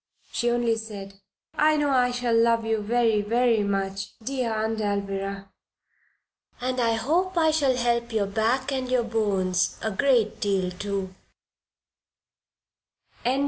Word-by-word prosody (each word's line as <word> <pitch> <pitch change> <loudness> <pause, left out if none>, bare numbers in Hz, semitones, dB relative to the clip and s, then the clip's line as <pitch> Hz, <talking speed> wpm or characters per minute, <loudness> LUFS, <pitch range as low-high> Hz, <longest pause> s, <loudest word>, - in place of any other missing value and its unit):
She 240 - 0
only 235 -1 +1
said: 200 -3 -8 0.3
"I 305 0 +3
know 290 -1 +1
I 250 -2 +3
shall 245 -1 0
love 230 0 +3
you 225 -1 0
very, 225 0 +2
very 230 +1 +2
much, 195 -1 -2
dear 250 0 -2
Aunt 220 0 -1
Alvirah. 195 -1 -3 1.1
And 255 +1 -2
I 230 -1 +2
hope 340 +11 0
I 320 -1 +4
shall 280 -5 +2
help 235 -1 0
your 215 -3 +1
back 230 +7 0
and 260 -2 -2
your 250 -1 +2
bones 195 -5 0
a 220 - -2
great 235 0 +2
deal, 190 -3 0
too!" 195 0 -4
225 Hz, 135 wpm, -25 LUFS, 200-250 Hz, 1.1 s, I